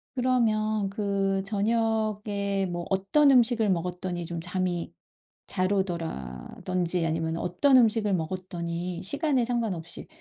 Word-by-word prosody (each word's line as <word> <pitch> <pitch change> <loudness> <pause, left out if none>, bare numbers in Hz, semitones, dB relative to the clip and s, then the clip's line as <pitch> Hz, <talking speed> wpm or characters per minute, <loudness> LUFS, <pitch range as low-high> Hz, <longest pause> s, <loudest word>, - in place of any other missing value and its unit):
그러면 215 -5 +1
그 195 -1 -1
저녁에 210 -2 0
뭐 175 -1 -4
어떤 195 +10 +3
음식을 235 -4 +4
먹었더니 180 0 -2
좀 170 0 -4
잠이 180 0 -2 0.5
잘 185 0 0
오더라든지 170 - -2
아니면 160 0 -1
어떤 220 +11 +3
음식을 220 -4 +3
먹었더니 175 0 -3
시간에 275 - +1
상관없이 210 -9 -2
195 Hz, 265 characters per minute, -27 LUFS, 175-220 Hz, 0.5 s, 음식을